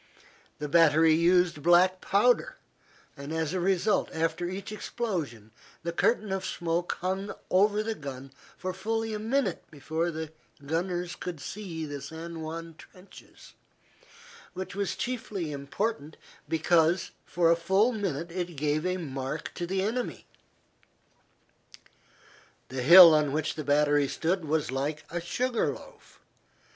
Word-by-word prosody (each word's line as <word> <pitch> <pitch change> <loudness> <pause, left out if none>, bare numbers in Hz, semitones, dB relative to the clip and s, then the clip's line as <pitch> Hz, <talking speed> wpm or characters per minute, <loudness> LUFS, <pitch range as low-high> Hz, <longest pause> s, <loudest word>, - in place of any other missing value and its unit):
The 150 - -4
battery 160 0 +5
used 175 -1 +3
black 180 +3 +4
powder, 240 +5 +2 0.6
and, 140 +1 -8
as 160 0 -1
a 185 - 0
result, 195 +3 +1
after 165 +2 -1
each 195 +3 -6
explosion 170 - -4 0.3
the 170 - -2
curtain 215 +4 +1
of 190 0 -2
smoke 170 +1 -2
hung 190 +2 -2 0.2
over 205 +3 +3
the 225 +1 -2
gun 135 -6 -8 0.3
for 185 0 -4
fully 225 +3 -2
a 210 - -3
minute 255 +6 -1
before 160 +3 -2
the 160 -1 -5 0.3
gunners 175 +3 -2
could 175 -4 -6
see 170 -2 -6
the 145 -2 -6
San 160 +3 -7
Juan 165 +1 -6
trenches, 185 +2 -16 1.0
which 185 +1 -5
was 200 -1 -2
chiefly 200 -6 -4
important 150 +4 -3 0.3
because 165 +2 +2
for 170 -1 +2
a - - +5
full 190 +8 +2
minute 175 - -3
it 175 -1 -4
gave 150 +3 0
a 185 0 -1
mark 135 -2 -5
to 175 - -4
the 190 +1 0
enemy. 240 +4 -3 2.4
The 130 -1 -4
hill 170 +4 +10
on 150 -2 +2
which 155 0 -1
the 155 - -5
battery 145 0 +3
stood 170 +4 -1
was 150 -2 0
like 145 +3 -2
a 175 0 -3
sugar 240 +7 0
loaf. - - -14
170 Hz, 135 wpm, -28 LUFS, 155-190 Hz, 2.4 s, hill